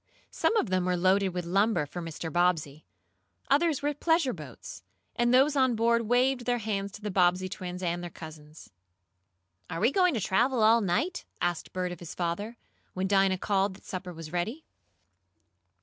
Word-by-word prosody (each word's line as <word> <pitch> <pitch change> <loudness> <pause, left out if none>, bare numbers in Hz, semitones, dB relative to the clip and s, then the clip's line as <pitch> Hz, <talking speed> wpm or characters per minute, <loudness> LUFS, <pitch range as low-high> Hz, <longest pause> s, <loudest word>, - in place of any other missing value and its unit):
Some 460 - +1
of 220 - 0
them 185 -1 +1
were 180 0 +1
loaded 190 +2 +3
with 180 -1 -4
lumber 195 -1 +2
for 175 +5 -7
Mr. 165 -1 -6
Bobbsey. 165 -4 0 0.6
Others 290 0 +2
were 295 +1 +1
pleasure 320 -2 +1
boats, 150 -8 -10 0.3
and 240 0 +2
those 270 +4 +4
on 260 -3 +3
board 230 0 +2
waved 250 +1 +2
their 245 -1 +1
hands 200 -3 -3
to 210 - -10
the 210 - -3
Bobbsey 180 0 +2
twins 180 -1 -6
and 175 0 -1
their 175 - -6
cousins. 155 -2 -12 1.0
"Are 165 - -4
we 230 +6 +3
going 360 -2 +3
to - - 0
travel 230 +5 +2
all 225 +2 +5
night?" 295 - -1 0.2
asked 175 -1 -2
Bert 180 -1 -2
of 175 - -8
his 175 - -9
father, 195 +7 -3 0.4
when 185 +1 -1
Dinah 195 -1 +3
called 195 0 0
that - - -18
supper 185 -1 -6
was 165 -2 -9
ready. 215 - -3
190 Hz, 180 wpm, -28 LUFS, 175-240 Hz, 1.0 s, all